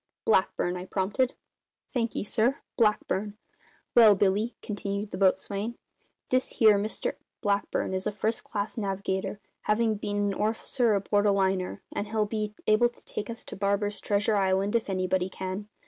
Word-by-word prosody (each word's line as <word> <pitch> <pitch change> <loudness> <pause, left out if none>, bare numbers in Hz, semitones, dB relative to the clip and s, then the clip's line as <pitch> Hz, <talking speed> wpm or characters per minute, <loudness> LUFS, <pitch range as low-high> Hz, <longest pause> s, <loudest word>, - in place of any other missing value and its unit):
"Blackburn," 185 -3 +2
I 180 - -6
prompted. 205 +7 0 0.6
"Thank 235 -3 -1
'e, - - -1
sir. 235 +6 +1 0.2
Blackburn. 210 -2 +1 0.6
Well, 220 -3 +8
Billy," 205 +4 +1
continued 205 -1 -3
the - - -4
boatswain, 200 +3 +1 0.5
"this 255 0 +1
here 215 -3 +6
Mr 215 +2 -2 0.2
Blackburn 200 -3 0
is 190 +2 -1
a - - 0
first 220 +2 -1
class 205 +2 -3
navigator, 195 0 -2 0.3
havin' 220 0 +2
been 205 0 -3
an 205 -1 +1
orficer 220 +2 +1
aboard 205 +1 +2
a - - +5
liner, 190 -2 0
and 205 - -2
he'll 215 0 +1
be 210 0 -3
able 215 +3 +4
to 240 - -21
take 210 +1 -5
us 230 0 -6
to - - -8
Barber's 200 +1 0
treasure 205 +1 +1
island, 195 +2 +1
if 230 -3 +1
anybody 185 -1 0
can. 190 +2 -5
205 Hz, 160 wpm, -28 LUFS, 195-220 Hz, 0.6 s, Well